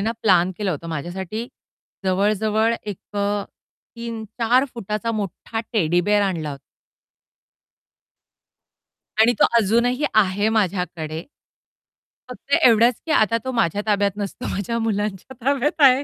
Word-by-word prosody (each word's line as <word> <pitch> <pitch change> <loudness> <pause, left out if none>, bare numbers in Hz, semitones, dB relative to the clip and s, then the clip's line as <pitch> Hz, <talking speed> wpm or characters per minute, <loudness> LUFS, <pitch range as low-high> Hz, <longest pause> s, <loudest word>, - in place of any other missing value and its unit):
ना 220 +3 0
प्लॅन 185 -3 +4
केलं 205 -3 -1
होतं 165 +1 -5
माझ्यासाठी 180 +8 -4 0.6
जवळ, 195 +3 +2
जवळ 220 +2 +1
एक 205 -3 -5 0.2
अ, 205 0 0 0.5
3-4 230 +2 0
फुटाचा 215 0 -3
मोठा 215 +2 -4
टेडी 175 -5 +2
बिअर 205 +3 +2
आणला 170 -6 -1
होता. 140 -1 -8 2.6
आणि 235 +2 +6
तो - - +7
अजूनही 235 +6 +2
आहे 205 0 +3
माझ्याकडे. 170 -5 -2 1.1
फक्त 275 +3 -2
एवढाच 235 0 +6
की 320 - -5
आता 225 -1 +3
तो 260 - -3
माझ्या 205 -4 +1
ताब्यात 205 -1 +2
नसतो, 200 -2 -5
माझ्या 205 +4 -2
मुलांच्या 210 0 -2
ताब्यात 280 +1 +2
आहे. 265 0 +7
210 Hz, 125 wpm, -22 LUFS, 190-230 Hz, 2.6 s, तो